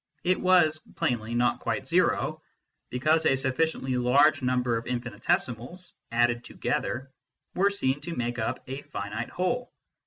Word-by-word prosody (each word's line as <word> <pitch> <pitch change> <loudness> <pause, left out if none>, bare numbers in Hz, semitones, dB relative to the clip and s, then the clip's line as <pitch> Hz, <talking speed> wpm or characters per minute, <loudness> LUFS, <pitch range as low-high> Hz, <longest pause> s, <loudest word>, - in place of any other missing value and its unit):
It 185 +1 +1
was 175 -4 +4 0.2
plainly 120 -1 -1
not 120 0 +2
quite - - -2
zero, - - +1 0.5
because 155 +6 +2
a 135 - +4
sufficiently 135 0 0
large 140 +4 +4
number 125 -2 +1
of 115 - -4
infinitesimals, 125 - -2 0.2
added 120 0 +2
together, 130 +1 -3 0.4
were 195 +2 +3
seen 145 -9 -1
to 165 +2 -5
make 120 0 -2
up 110 - -2
a 135 +2 -5
finite 105 -1 -5
whole. 245 +8 -2
130 Hz, 135 wpm, -27 LUFS, 120-160 Hz, 0.5 s, was